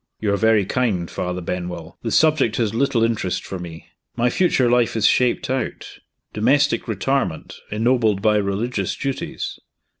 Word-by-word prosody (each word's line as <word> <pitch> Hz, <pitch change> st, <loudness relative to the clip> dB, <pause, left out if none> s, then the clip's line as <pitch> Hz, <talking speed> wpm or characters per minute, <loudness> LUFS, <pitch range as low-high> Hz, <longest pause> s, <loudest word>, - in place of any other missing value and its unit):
"You 105 Hz, -2 st, 0 dB
are -, -, +1 dB
very 110 Hz, -2 st, +3 dB
kind, 100 Hz, -7 st, 0 dB
Father 90 Hz, 0 st, -3 dB
Benwell. 90 Hz, -1 st, -5 dB
The 115 Hz, -, -3 dB
subject 150 Hz, -4 st, +3 dB
has 110 Hz, -3 st, 0 dB
little 120 Hz, -1 st, +1 dB
interest 110 Hz, -5 st, -1 dB
for 95 Hz, -, -6 dB
me. 85 Hz, -2 st, -9 dB, 0.3 s
My 120 Hz, +1 st, +1 dB
future 155 Hz, -8 st, +2 dB
life 120 Hz, -1 st, +2 dB
is 110 Hz, -2 st, +1 dB
shaped 125 Hz, +2 st, +2 dB
out 130 Hz, -2 st, -4 dB, 0.3 s
domestic 140 Hz, +8 st, +2 dB
retirement, 110 Hz, -4 st, -2 dB
ennobled 110 Hz, -2 st, +2 dB
by 105 Hz, +1 st, +3 dB
religious 100 Hz, +1 st, -1 dB
duties." 135 Hz, -1 st, -4 dB
110 Hz, 150 wpm, -21 LUFS, 95-125 Hz, 0.3 s, very